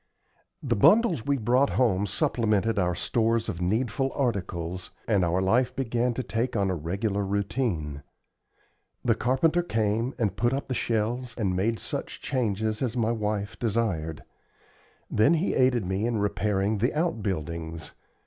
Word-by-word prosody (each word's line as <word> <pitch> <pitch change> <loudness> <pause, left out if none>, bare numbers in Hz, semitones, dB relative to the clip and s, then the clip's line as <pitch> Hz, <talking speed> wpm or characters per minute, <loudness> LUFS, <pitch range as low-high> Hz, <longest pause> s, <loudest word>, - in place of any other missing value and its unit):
The - - +1
bundles 175 - +4
we 140 -1 +2
brought 125 +4 +3
home 105 -6 +2
supplemented 110 - +1
our 90 -2 +1
stores 115 +4 +1
of 90 -5 -4
needful 120 +7 0
articles, 90 -8 -2 0.2
and 100 -5 +3
our 90 +2 +1
life 125 +6 +2
began 120 -1 0
to 130 - -2
take 120 +2 -2
on 100 -3 +1
a - - -1
regular 100 +6 -2
routine. 100 - -2 1.0
The 120 - +4
carpenter 135 +9 +2
came 115 -3 0
and 105 -6 0
put 120 +3 +1
up 140 +1 -3
the - - 0
shelves, 120 +1 -1
and 95 -6 0
made 110 +5 +1
such - - -5
changes 110 -4 -1
as 125 -2 -1
my 115 -1 +2
wife 105 -2 -2
desired; 100 -9 -1 0.8
then 140 +10 +3
he 165 +4 0
aided 125 -5 +3
me 95 +5 -1
in 120 -2 0
repairing 105 0 0
the 120 +7 +1
out 160 -6 0
buildings. 85 -4 -4
110 Hz, 150 wpm, -27 LUFS, 95-125 Hz, 1.0 s, bundles